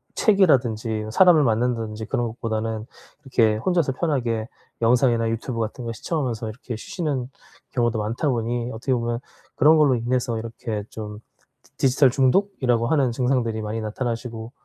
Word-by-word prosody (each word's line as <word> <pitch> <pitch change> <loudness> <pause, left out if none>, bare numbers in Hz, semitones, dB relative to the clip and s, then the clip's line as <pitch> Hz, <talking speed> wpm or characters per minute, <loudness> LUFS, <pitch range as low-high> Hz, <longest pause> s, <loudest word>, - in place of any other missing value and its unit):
책이라든지 120 - +2
사람을 175 -1 +6
만난다든지 110 -2 0
그런 120 +1 -1
것보다는 110 0 -3 0.3
이렇게 115 -6 +2
혼자서 170 +3 +1
편하게 120 -7 -1 0.3
영상이나 115 -1 +3
유튜브 115 +1 -3
같은 115 +2 -3
거 115 - -3
시청하면서 120 -3 -3
이렇게 115 +1 -7
쉬시는 135 - -3 0.4
경우도 120 -3 0
많다 115 +8 -1
보니 120 0 -1
어떻게 130 +3 -1
보면 120 -1 -1 0.4
그런 155 +2 +6
걸로 145 -4 +4
인해서 120 0 -1
이렇게 115 -1 -5
좀 105 -1 -7 0.4
디 - - -28
디지털 130 +1 +4
중독이라고 130 - +2
하는 135 -4 +2
증상들이 120 -3 0
많이 110 +1 -3
나타나시고 115 +1 -4
120 Hz, 385 characters per minute, -23 LUFS, 110-130 Hz, 0.4 s, 사람을